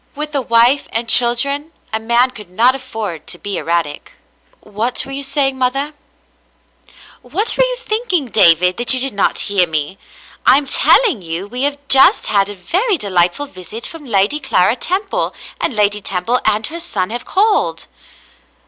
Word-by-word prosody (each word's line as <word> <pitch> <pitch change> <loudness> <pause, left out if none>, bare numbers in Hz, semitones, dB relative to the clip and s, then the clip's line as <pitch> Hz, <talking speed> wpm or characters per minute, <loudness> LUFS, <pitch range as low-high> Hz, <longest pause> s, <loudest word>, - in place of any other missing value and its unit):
With 300 +1 -4
a 280 - 0
wife 240 +3 +3
and 230 +1 -2
children 280 +7 +1 0.2
a 220 - 0
man 235 +3 +2
could 210 -7 -12
not 230 +8 +3
afford 220 - -6
to 175 - -6
be 200 +2 -4
erratic. 165 -3 -3 0.5
*'WTiat 220 +4 -1
were 270 - -10
you 275 +1 -5
saying, 270 -1 -1
mother?" 275 +4 -1 1.3
*'^Vhat 350 - 0
were - - +3
you - - -1
thinking, 430 - -2
David, 180 -5 +4
that 240 +2 +3
you - - 0
did 270 0 -2
not 200 - 0
hear 195 -3 +1
me? 155 +4 -3 0.4
I - - +6
am 290 - +1
telling 315 - +3
you 170 +2 -5
we 250 +4 -5
have 285 +1 +1
just 270 0 +5
had 200 -1 +1
a 205 - -7
very 375 - 0
de 205 -8 -6
lightful 180 +10 +2
visit 215 0 -9
from 325 -3 -7
Lady 205 +6 +1
Clara 225 -6 +2
Temple, 385 +8 -2 0.2
and 250 - -1
Lady 210 0 +1
Temple 195 +7 -1
and 215 0 +1
her 335 +6 -4
son 185 - -3
have 240 +1 -5
called." 415 +2 0
240 Hz, 175 wpm, -16 LUFS, 200-285 Hz, 1.3 s, I